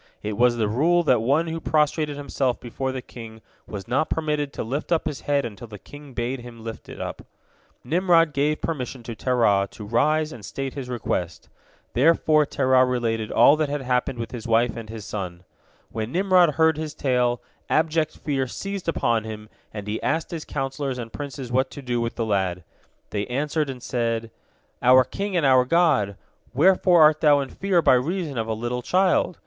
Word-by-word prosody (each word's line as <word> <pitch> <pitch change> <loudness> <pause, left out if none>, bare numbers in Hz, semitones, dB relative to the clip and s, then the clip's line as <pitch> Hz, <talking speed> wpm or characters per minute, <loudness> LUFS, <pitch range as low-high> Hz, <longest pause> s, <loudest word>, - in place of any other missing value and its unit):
It 105 0 -3
was 120 +2 +3
the 110 -2 +1
rule 165 +11 +2
that 125 -7 +3
one 140 +8 +2
who 165 0 -4
prostrated 150 -1 0
himself 135 -3 -1
before 130 +2 -4
the 130 -1 -5
king 110 -2 -11 0.3
was 100 -3 -7
not 135 +5 0
permitted 150 -3 -1
to - - -4
lift 140 +9 -4
up 165 - +2
his 145 - -4
head 140 -2 0
until 115 +1 -8
the 105 -1 -10
king 145 +5 -13
bade 125 +2 -2
him 120 -2 -11
lift 115 -1 -8
it - - -9
up. - - -5 0.6
Nimrod 165 +1 +3
gave 150 +2 0
permission 130 -5 -4
to 115 - -6
Terah 105 -5 +2
to 105 - -10
rise 155 +8 +1
and 115 - -11
state 135 +4 -5
his 135 -3 -6
request. 90 -8 -3 0.4
Thereupon 155 +2 +3
Terah 130 -1 +3
related 115 -4 -1
all 145 - +6
that 155 -2 0
had 145 -1 -3
happened 125 0 0
with 115 -2 -5
his 115 -2 -7
wife 115 0 +2
and 115 -2 -8
his 110 -2 -7
son. 90 -5 -6 0.5
When 110 +1 -4
Nimrod 180 -4 +3
heard 160 -1 +3
his 155 -1 -5
tale, 125 -3 +1 0.3
abject 155 0 +1
fear 135 -3 -1
seized 195 +8 -6
upon 115 -8 +1
him, 110 -1 -8 0.2
and 105 -1 -7
he 105 +1 -3
asked 160 +2 -1
his 165 -3 -5
counsellors 135 -1 -3
and 115 -2 -7
princes 135 -4 -6
what 130 +1 +1
to 140 - -9
do 120 -2 -1
with 115 0 -3
the 115 - -1
lad. 95 -4 -1 0.5
They 105 -1 -2
answered, 150 +3 -1
and 125 -2 -7
said: 115 -2 -2 0.5
"Our 130 +1 +6
king 195 +7 -3
and 165 - +2
our 130 -1 +5
god! 125 - +2 0.4
Wherefore 175 +2 +5
art 155 0 +5
thou 145 -2 +5
in 135 - -5
fear 185 0 +1
by - - +6
reason 145 +1 -1
of 110 - -2
a 110 - -1
little 120 +2 -3
child? 180 +3 +2
130 Hz, 195 wpm, -24 LUFS, 115-155 Hz, 0.6 s, all